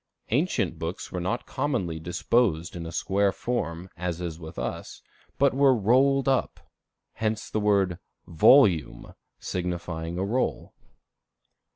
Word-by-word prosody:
Ancient 110 - 0
books 80 +3 -5
were 90 - -3
not 105 +8 -2
commonly 120 - -2
disposed 85 +1 0
in 85 -1 -5
a - - -7
square 100 +4 +1
form, 95 -7 -3
as 85 -2 -4
with 80 -1 -10
us, - - -5 0.3
but 140 -1 +3
were 135 -1 +4
rolled 130 +6 +3
up. 135 -2 0 0.5
Hence 110 -1 -3
the 110 - 0
word 100 -4 +2 0.3
volume, 85 - +4 0.3
signifying 85 -2 -4
a 95 - -1
roll. 125 +6 -2
95 Hz, 120 wpm, -26 LUFS, 85-120 Hz, 0.5 s, were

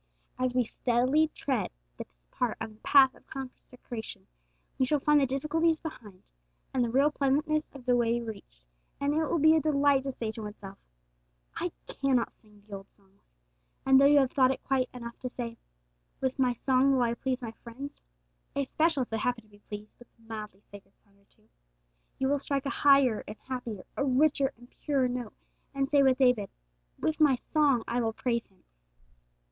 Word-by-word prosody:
As 255 -1 0
we 250 - +4
steadily 255 +7 +2
tread 265 -7 -2 0.3
this - - -12
part 240 -3 -1
of 225 0 -5
the 215 - -22
path 265 0 +5
of - - -22
consecration, 250 -3 -8 0.5
we 260 - +4
shall 300 - +2
find 295 +1 +4
the 270 - +2
difficulties 315 +5 +1
left 320 - -6
behind, 200 -4 -15 0.5
and 255 - +2
the 235 - -1
real 275 +5 +3
pleasantness 300 +2 0
of 270 -3 -12
the 250 -1 +3
way 235 0 +2
reached, 200 - -9 0.3
and 280 +1 0
it 315 0 +1
will 335 - 0
be 315 +1 +6
a 320 - +3
delight 285 -2 +3
to 270 - -1
say 225 -4 -4
to 220 - -8
oneself, 205 -2 -9 0.8
'I - - -2
cannot 260 - 0
sing 210 -2 -21
the 205 -2 -8
old 195 - -15
songs;' 195 - -32 0.5
and 265 0 +6
though 280 - +7
you 290 0 +6
have 270 -2 +3
thought 260 -2 +4
it 265 - -3
quite 260 -2 0
enough 235 -1 -9
to 255 - -4
say, 235 -2 -5 0.6
'With 260 0 -2
my 250 -2 +3
song 260 +2 +2
will 255 -2 +3
I 235 -1 +1
please 255 +1 -3
my 225 - -4
friends,' 245 +5 -10 0.5
especially 280 +1 +1
if - - -10
they 220 - -1
happen 245 0 -1
to 215 - -26
be 205 - -19
pleased 210 0 -10
with 240 - -16
a - - -27
mildly 215 -3 -8
sacred 200 -1 -14
song 200 -1 -31
or 200 - -31
two, - - -32 0.7
you 265 - 0
will 285 +1 +1
strike 275 0 -2
a 280 - -1
higher 275 -6 +4
and 210 - -8
happier, 245 -7 -6
a - - 0
richer 275 +1 +2
and 245 +1 -16
purer 275 -4 +1
note, 245 -3 -5 0.4
and 275 +1 -1
say 285 -1 +5
with 265 -2 +4
David, 250 -7 +3 0.5
'With 315 0 -1
my 295 -4 +5
song 280 -2 +1
will 235 -1 0
I - - -25
praise 235 -2 -1
Him.' 190 -2 -31
255 Hz, 195 wpm, -29 LUFS, 225-275 Hz, 0.8 s, though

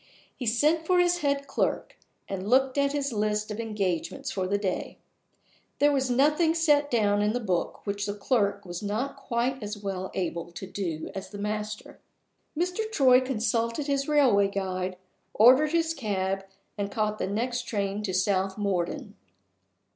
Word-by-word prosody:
He 250 - -5
sent 305 +8 +2
for 365 - +4
his 355 0 +3
head 280 -2 0
clerk, - - -1 0.3
and 195 +1 -4
looked 260 +1 +3
at 280 -1 +2
his 280 -3 -2
list 210 0 -1
of 210 - -5
engagements 200 -7 -2
for 190 -2 -2
the 200 +2 +1
day. 195 -3 -3 0.8
There 290 +1 +4
was 265 -2 +1
nothing 300 +6 +3
set 295 -3 +3
down 205 -4 +2
in 210 +1 +1
the 245 - 0
book 185 -7 -2
which 200 0 -2
the 205 - -3
clerk 205 -2 0
was 175 -1 -6
not 215 +7 -2
quite 260 -1 -2
as 210 0 -5
well 195 -2 -4
able 170 -2 -3
to 190 - -6
do 180 -5 -4
as 190 - -6
the 205 - -8
master. 210 +1 -4 0.6
Mr. 360 +6 -1
Troy 260 -9 +5
consulted 230 +1 -1
his 275 -1 0
railway 260 -10 +4
guide, 185 -2 -3 0.4
ordered 260 +7 +6
his 330 -1 +1
cab, 195 -7 -2 0.3
and 200 0 -1
caught 215 0 -1
the - - -1
next 240 +4 -2
train 200 -1 -2
to 205 -3 -2
South 190 +1 +1
Morden. 200 +4 -2
215 Hz, 165 wpm, -27 LUFS, 200-275 Hz, 0.8 s, ordered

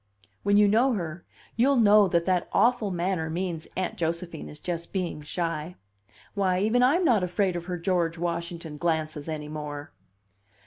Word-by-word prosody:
When 205 0 +3
you 210 0 +6
know 240 +6 +3
her, 170 -4 -4 0.3
you'll 265 +5 +3
know 210 -3 +6
that 170 -1 +1
that 185 -2 +1
awful 235 -3 +3
manner 175 -2 -1
means 170 -1 -3
Aunt 185 -1 -2
Josephine 170 - -3
is 75 - -9
just 170 -2 -5
being 180 -5 -3
shy. 165 +1 -3 0.6
Why, 190 -2 +1
even 220 +5 +2
I'm 305 +9 +4
not 220 - +4
afraid 180 +1 0
of 175 0 -4
her 180 -1 -3
George 170 -1 0
Washington 170 -2 -4
glances 155 -2 -2
any 150 -1 -4
more!" 150 -1 -6
175 Hz, 165 wpm, -27 LUFS, 165-200 Hz, 0.6 s, you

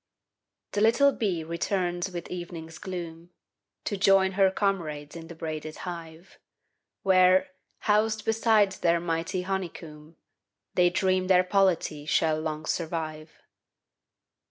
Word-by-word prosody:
The 205 - -1
little 235 +6 +5
bee 190 -11 -2
returns 175 +2 -2
with 175 -2 -6
evening's 170 -2 -7
gloom, 170 -2 -7 0.5
To 205 - -2
join 195 -1 +4
her 190 0 +4
comrades 170 -7 -2
in 165 -1 -8
the 170 - -10
braided 155 -1 -5
hive, 170 0 -9 0.6
Where, 185 -1 +5 0.3
housed 215 0 +1
beside 220 -2 +3
their 170 -2 +1
mighty 165 +2 -2
honeycomb, 165 -5 -6 0.6
They 180 -1 +4
dream 185 0 +1
their 185 -1 +5
polity 180 -6 +1
shall 155 -1 +2
long 155 -1 -4
survive. 160 -2 -4
175 Hz, 115 wpm, -27 LUFS, 160-195 Hz, 0.6 s, little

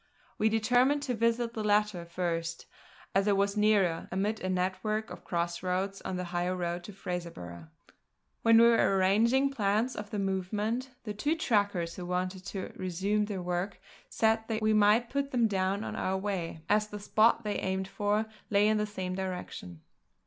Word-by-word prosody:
We 220 - +4
determined 250 +6 +3
to 260 -3 -1
visit 230 +1 +1
the 220 - -3
latter 210 -4 +1
first, 170 -1 -3 0.5
as 195 +1 +2
it 200 -1 +3
was 200 +1 +1
nearer, 205 -6 +2
amid 200 +4 -1
a 185 - -3
network 190 +4 -1
of - - -9
cross 170 0 -2
roads 190 +2 -2
on 185 - -4
the 180 - -2
high 175 +1 0
road 175 -1 -2
to - - -8
Fraserburgh. 170 - -6 0.7
When 230 0 +6
we 230 - +8
were 230 -4 +4
arranging 230 +9 +3
plans 220 +1 0
of 210 -1 -7
movement, 205 +5 -1
the 210 -3 -4
two 290 +10 0
trackers 200 - 0
who 180 -1 -6
wanted 185 +1 -2
to 190 -2 -5
resume 190 +4 0
their 200 -3 -4
work 180 +2 -2 0.3
said 220 0 +2
that 220 -1 -2
we 215 0 +3
might 215 +3 +4
put 280 0 -1
them 240 -4 +2
down 195 0 0
on - - -5
our 190 +1 -1
way, 185 -5 -3
as 210 0 +2
the 210 0 -7
spot 220 +3 +3
they 210 -1 -2
aimed 190 0 -2
for 205 +2 0 0.2
lay 205 0 +4
in 215 0 +3
the 210 0 0
same 185 -3 -4
direction. 180 - -5
200 Hz, 180 wpm, -30 LUFS, 185-220 Hz, 0.7 s, we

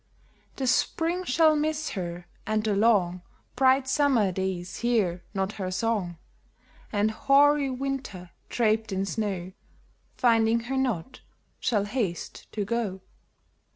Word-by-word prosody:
The 270 - -3
Spring 330 +7 +1
shall 315 +2 +4
miss 305 0 -1
her, 175 -2 -5 0.2
and 215 0 0
the 215 -2 +1
long, 195 -5 +3 0.3
Bright 260 +1 +4
Summer 260 -7 +3
days 185 -1 -3
hear 210 -8 +1
not 195 0 0
her 185 - -2
song; 185 -3 -1 0.7
BLEST - - -26
93 205 - 0
And 215 +1 +2
hoary 280 +4 +4
Winter, 255 -9 -4 0.2
draped 220 -2 +1
in 190 0 -1
snow, 195 -4 -3 0.7
Finding 230 -1 +3
her 265 +3 -3
not, 250 -6 -2 0.4
shall 210 -5 +1
haste 205 -6 -4
to 205 -2 -2
go 205 -4 -2
220 Hz, 130 wpm, -27 LUFS, 190-260 Hz, 0.7 s, shall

